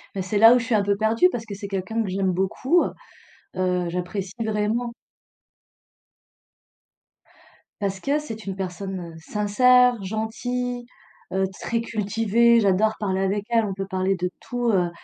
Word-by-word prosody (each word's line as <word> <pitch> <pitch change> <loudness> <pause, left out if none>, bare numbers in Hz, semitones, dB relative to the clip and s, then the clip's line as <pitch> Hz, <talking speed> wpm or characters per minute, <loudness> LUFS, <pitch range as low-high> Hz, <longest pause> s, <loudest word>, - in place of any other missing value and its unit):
Bah, 190 - -2
c'est 185 +3 -2
là 225 +3 +9
où - - +3
je 230 - -4
suis 230 -1 +1
un 205 - +3
peu 200 0 +1
perdue 220 - +3
parce 230 -2 -5
que 205 -2 -7
c'est 200 0 -7
quelqu'un 195 +4 -2
que 195 - -4
j'aime 190 0 0
beaucoup, 195 - +1 0.7
heu, 180 -1 0
j'apprécie 185 +2 -4
vraiment 220 +3 -1 2.9
Parce 195 -1 -2
que 280 +6 0
c'est 225 -8 -8
une 190 -1 -4
personne 185 -2 -5
sincère, 245 +6 +3
gentille, 245 +4 -3 0.5
heu, 190 +1 +1 0.2
très 230 - -1
cultivée. 225 +2 +2
J'adore 210 +1 +3
parler 190 -2 -1
avec 200 +1 0
elle, 230 -2 +3
on 195 - -3
peut 195 0 -4
parler 190 +1 0
de 180 0 -3
tout, 245 -1 -1
heu, 180 -4 +2
205 Hz, 155 wpm, -24 LUFS, 190-230 Hz, 2.9 s, là